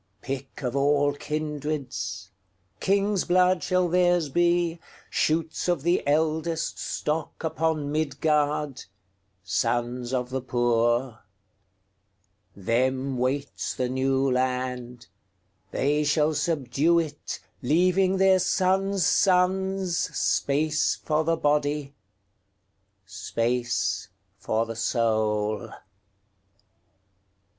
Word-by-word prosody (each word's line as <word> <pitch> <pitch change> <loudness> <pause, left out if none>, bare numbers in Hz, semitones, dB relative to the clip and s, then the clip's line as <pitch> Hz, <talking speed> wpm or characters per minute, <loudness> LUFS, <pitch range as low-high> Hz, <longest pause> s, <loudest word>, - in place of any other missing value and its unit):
Pick 135 +2 -6
of 125 0 -2
all 145 +1 +2
kindreds, 140 -10 -4 0.5
King's 200 0 +1
blood 180 0 +3
shall 185 +2 +1
theirs 175 -2 +2
be, 175 +1 +1 0.3
Shoots 160 +2 0
of 175 -6 0
the 175 +2 +2
eldestStock 160 0 -1
upon 160 -2 -1
Midgard, 150 -2 0 0.6
Sons 120 +6 -1
of 125 -1 -2
the 130 0 -2
poor. 120 -1 +1 1.4
Them 130 +6 0
waits 135 +3 -2
the 125 -1 -1
New 135 +1 +1
Land; 125 -1 -2 0.6
They 150 +2 +1
shall 150 +1 +2
subdue 150 +1 +1
it, 155 -3 -3 0.2
Leaving 185 +7 +2
their 190 0 +5
sons' 190 +1 +1
sonsSpace 180 -5 +1
for 155 0 +1
the 165 +1 +1
body, 145 -1 0 1.1
Space 120 +6 -1 0.3
for 110 +1 0
the 115 0 -6
soul. 110 -2 0
145 Hz, 85 wpm, -26 LUFS, 125-170 Hz, 1.4 s, their